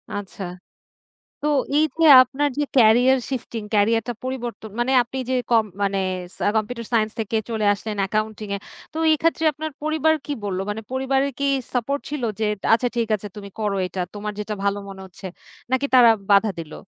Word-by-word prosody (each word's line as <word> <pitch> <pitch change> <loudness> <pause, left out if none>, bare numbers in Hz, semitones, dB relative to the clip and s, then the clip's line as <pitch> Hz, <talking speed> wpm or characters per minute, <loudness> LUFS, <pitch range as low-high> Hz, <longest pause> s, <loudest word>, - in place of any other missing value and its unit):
আচ্ছা। 200 -1 -6 1.0
তো 300 - -1 0.3
এই 310 - +5 0.2
যে - - +6 0.2
আপনার 285 +3 -1
যে 295 - +2
ক্যারিয়ার 245 +3 +6
শিফটিং, 240 -3 -4
ক্যারিয়ার 225 +2 +3
টা 240 - -2
পরিবর্তন 240 -4 -5
মানে 250 +2 +1
আপনি 260 +3 -8
যে - - +1 0.2
কম 225 -2 +4 0.2
মানে 195 0 0 0.4
সা - - -2
কম্পিউটার 230 +1 -2
সাইন্স 215 -1 +2
থেকে 220 +1 -1
চলে 220 -2 -1
আসলেন 210 +1 -5
অ্যাকাউন্টিং 215 +1 -2
এ। - - -2 0.4
তো - - -6
এই - - +5
ক্ষেত্রে 330 0 +1
আপনার 310 +1 -5
পরিবার 315 0 +2
কি 295 - -5
বলল? 190 -2 -2
মানে 215 +2 -3
পরিবারের 265 +1 0
কি 280 - 0 0.3
সাপোর্ট 275 +4 0
ছিল 290 -4 -4 0.2
যে, 220 - +1 0.3
"আচ্ছা 245 +2 +3
ঠিক 230 -2 +1
আছে 205 +1 -7
তুমি 200 -1 -8
করো 205 -2 0
এটা 185 0 -4
তোমার 210 0 -4
যেটা 210 0 -3
ভালো 200 0 +1
মনে 190 0 -9
হচ্ছে।" 190 +1 -13 0.5
নাকি 260 +2 +2
তারা 240 -2 +8 0.2
বাধা 200 +1 +5
দিলো? 160 -2 -8
225 Hz, 185 wpm, -22 LUFS, 210-265 Hz, 1.0 s, তারা